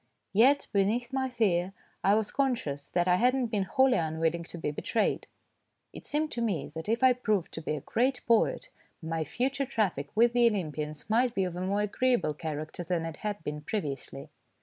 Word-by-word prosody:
Yet 265 +8 +5
beneath 225 +6 +1
my 265 -1 0
fear 195 -6 +1 0.3
I 200 +2 +5
was 215 -1 0
conscious 230 - -1
that 175 0 0
I 180 0 +4
had 250 +5 +3
not 250 -4 -1
been 200 -4 0
wholly 260 +2 +3
unwilling 165 +1 -1
to 170 - -8
be 160 - -2
betrayed. 150 - -1 0.7
It - - -9
seemed 305 +1 -1
to 235 - -3
me 195 -11 -1
that 160 +5 -6
if 230 +3 +1
I 260 -1 +7
proved 215 -7 -1
to 160 - -5
be 155 - -2
a 145 - -5
great 250 - 0
poet, 230 -1 +2 0.3
my 160 -1 -2
future 265 - -1
traffic 195 - -1
with 235 +2 +4
the 240 -1 +5
Olympians 155 -7 -4
might 235 +2 +2
be 195 - +2
of 180 -2 -3
a 180 - -4
more 200 +2 0
agreeable 230 -5 +1
character 155 +2 -5
than 170 -1 -1
it 165 -2 -6
had 205 -4 -4
been 150 0 -4
previously. 145 -4 -5
200 Hz, 195 wpm, -29 LUFS, 160-240 Hz, 0.7 s, I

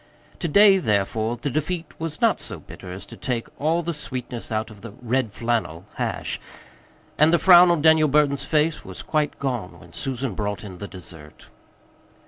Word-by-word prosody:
To 170 - -1
day, 195 +4 +6
therefore, 110 - 0
the 130 +4 -3
defeat 160 +5 -2
was 160 -1 -5
not - - +3
so - - -5
bitter 90 - -11
as 95 +2 -7
to - - -11
take 120 -3 -3
all 165 +3 +1
the 170 +1 -2
sweetness 125 -6 -6
out 110 +1 -2
of 105 -2 -14
the 115 -3 -9
"red 125 -1 -1
flannel" 110 -7 -2
hash, - - -3 0.8
and 155 +2 +6
the 170 - +5
frown 180 0 +8
on 170 -4 +2
Daniel 160 -1 +6
Burton's 145 -1 +2
face 155 +1 +1
was - - -9
quite 150 -2 -1
gone 125 -9 -4
when - - -16
Susan 130 -3 -3
brought 105 +1 -3
in 95 -4 -9
the 100 - -6
dessert. 80 -6 -13
130 Hz, 180 wpm, -23 LUFS, 110-155 Hz, 0.8 s, frown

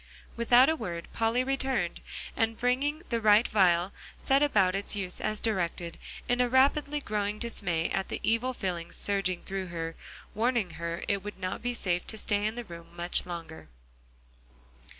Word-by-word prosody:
Without 240 +2 +6
a 320 - +3
word 175 - -5
Polly 230 +2 +2
returned, 265 -9 -1 0.3
and 225 0 +1
bringing 280 +6 0
the 230 -1 0
right 215 +2 +6
vial 185 -2 +3 0.2
set 270 +1 +2
about 200 -11 +4
its 200 +2 -1
use 185 -3 -2
as 215 0 0
directed, 175 -5 -2 0.3
in 245 +1 +2
a 245 - +2
rapidly 285 +3 +3
growing 210 -5 -2
dismay 180 -8 0
at 195 +1 -1
the - - -3
evil 230 +3 +2
feelings 180 -8 -4
surging 195 -3 -1
through 190 -1 -3
her, 165 -1 -4 0.4
warning 230 -4 +1
her 170 +1 -4
it 200 -1 +1
would 205 -1 -7
not 185 -1 -4
be 245 0 -2
safe 180 -5 -1
to 220 - -5
stay 205 -1 0
in 220 - -3
the 240 - -4
room 170 -5 -10
much 175 +1 -1
longer. 165 -2 -7
205 Hz, 170 wpm, -29 LUFS, 180-240 Hz, 0.4 s, Without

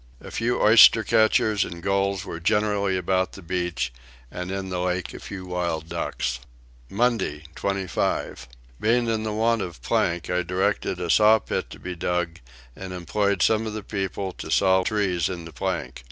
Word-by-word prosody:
A - - -11
few 120 +2 0
oyster 110 +1 +7
catchers 110 0 +3
and 85 0 -8
gulls 100 0 0
were 85 - -6
generally 100 0 +1
about 95 +1 0
the 95 - -11
beach, 85 -8 -2 0.4
and 90 0 -5
in 95 0 -4
the 90 -1 -2
lake 90 0 -2
a - - -8
few 95 -2 -8
wild 85 -3 -3
ducks. 60 0 -2 0.5
Monday 110 -9 0
25. 95 -1 -2 0.3
Being 120 +2 +2
in 110 -1 0
want 115 0 +2
of 85 -7 -6
plank 85 +5 0
I 90 0 0
directed 90 +1 -1
a 85 -2 -1
saw 110 +1 +6
pit - - -4
to - - -10
be 90 - -5
dug 85 -1 -2 0.4
and 95 -1 -7
employed 100 +1 0
some 110 0 +2
of 110 - -4
the 110 -1 -5
people 95 -1 -3
to - - -6
saw 95 -1 +4
trees 95 -6 0
into 85 -3 -7
plank. 85 -9 -3
95 Hz, 170 wpm, -24 LUFS, 90-105 Hz, 0.5 s, oyster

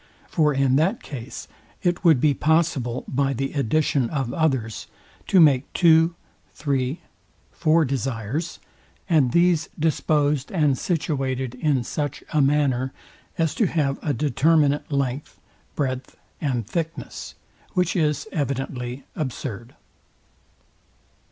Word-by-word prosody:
For 155 -3 +2
in 135 -1 +2
that 185 +10 +1
case 130 -3 -7 0.4
it 175 -1 0
would 160 -7 +6
be 145 +2 +3
possible, 145 -5 +1
by 135 +1 0
the 135 +2 -3
addition 140 -1 +1
of 135 -5 -2
others, 130 -9 -1 0.4
to 190 - +4
make 140 -5 +4
two, 165 -1 +5 0.4
three, 135 0 -1 0.5
four 160 0 +3
desires, 135 +4 -3 0.5
and 150 -8 +3
these 170 0 +3
disposed 150 -2 +1
and 150 -7 +2
situated 135 -6 -2
in 130 0 0
such 145 +3 -4
a 155 - +4
manner, 135 -2 +2 0.5
as 165 -2 +1
to 215 - +2
have 145 -5 0
a 150 - -1
determinate 150 +1 +2
length, 140 0 -2 0.4
breadth 130 -2 -3 0.2
and 125 -7 -1
thickness; 165 - -5 0.4
which 180 -2 +1
is 155 +1 0
evidently 135 -4 -3
absurd. 125 -5 -5
145 Hz, 115 wpm, -23 LUFS, 130-160 Hz, 0.5 s, would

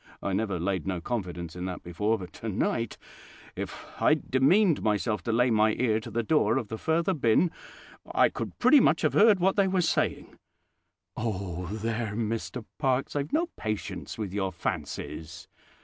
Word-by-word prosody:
I 100 - -1
never 100 -2 -1
laid 95 0 -1
no 95 -2 -1
confidence 90 -5 -4
in 90 0 -4
that 90 -1 -5
before; 105 +6 0
but 90 -3 -9
tonight, 115 +1 -2 0.6
if - - -6 0.2
I'd - - +2
demeaned 160 +7 +4
myself 105 -1 0
to 115 - 0
lay 120 +2 +3
my 110 0 +4
ear 110 -3 +1
to 110 - -9
the 115 +1 -1
door 115 -3 +2
of 120 -6 -3
the 110 - -5
further 170 +4 +1
bin, 140 +3 +3 0.6
I - - +4
could - - -6
pretty 300 - +6
much - - +3
have - - +2
heard 210 -2 +6
what 190 +3 +2
they 200 -1 +4
was 185 -3 +1
saying." - - -1 0.8
"Oh, 95 -5 -3
there, 110 +1 -3
Mr 115 +1 -3
Parkes, 135 -1 0
I've 145 0 -2
no 335 +2 +1
patience 110 -1 -4
with 105 -4 -4
your 95 -2 -1
fancies! 85 -3 -5
110 Hz, 170 wpm, -28 LUFS, 95-135 Hz, 0.8 s, pretty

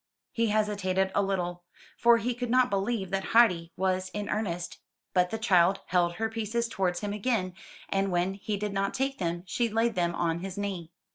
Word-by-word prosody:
He 230 0 +1
hesitated 200 -3 +1
a - - +3
little, 175 -3 -2 0.3
for 235 0 +5
he 240 +2 -1
could 245 0 -4
not 250 +1 +3
believe 195 -1 -1
that 195 0 0
Heidi 180 -8 +5
was 185 0 0
in 205 -1 -3
earnest; 175 -5 -3 0.3
but 180 -1 +3
the 225 - -3
child 190 -3 +3
held 175 -1 +2
her 225 +5 -1
pieces 225 +1 -2
towards 185 -5 -1
him 205 -1 -2
again, 210 -4 -1 0.3
and 195 0 0
when 175 +2 +1
he 205 +1 -3
did 205 0 -3
not 195 0 -1
take 270 +1 -1
them, 170 -1 -2
she 230 +6 0
laid 225 +2 +1
them 175 -3 0
on 165 -1 0
his 190 +1 -6
knee. 190 -5 -4
195 Hz, 195 wpm, -28 LUFS, 180-225 Hz, 0.3 s, for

